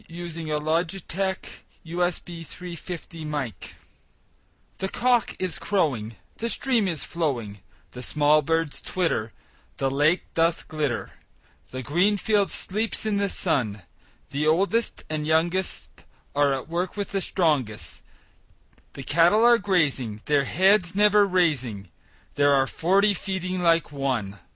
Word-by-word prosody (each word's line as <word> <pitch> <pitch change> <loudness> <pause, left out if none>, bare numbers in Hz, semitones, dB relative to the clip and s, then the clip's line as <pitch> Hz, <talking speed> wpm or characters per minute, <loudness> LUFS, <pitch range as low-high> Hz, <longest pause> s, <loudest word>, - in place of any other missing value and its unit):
William 165 -3 -4
Wordsworth 180 +3 -2 0.2
Written 175 0 -4
in 160 -2 -6
March 140 -7 -5 1.1
THE 190 - -2
cock 245 +1 +1
is 185 -3 -3
crowing, 130 - 0 0.2
The 230 - -2
stream 235 -5 +1
is 165 -4 -2
flowing, 120 -12 -3 0.3
The 125 - -8
small 150 +3 +3
birds 160 0 -1
twitter, 165 -12 -1 0.5
The 135 0 0
lake 150 +6 +2
doth 165 0 +1
glitter 150 -6 -2 0.6
The 130 0 -6
green 180 - +2
field 205 -1 +2
sleeps 215 +3 -2
in 210 -2 +1
the 200 0 +1
sun; 115 - -1 0.5
The 150 +2 0
oldest 200 +8 +1
and 155 -1 -3
youngest 170 +4 -1 0.3
Are 145 -1 +3
at 135 -1 -3
work 175 +4 -3
with 205 - -3
the 195 -1 -1
strongest; 145 - -1 0.9
The 135 - -8
cattle 170 - +4
are 240 -1 +6
grazing, 140 - 0
Their 145 -2 +2
heads 190 +3 +3
never 210 0 +5
raising; 130 - 0 0.4
There 145 0 +4
are 135 -1 +4
forty 195 +7 +2
feeding 185 -1 -3
like 165 -3 +3
one! 125 -8 -2
165 Hz, 125 wpm, -25 LUFS, 145-190 Hz, 1.1 s, are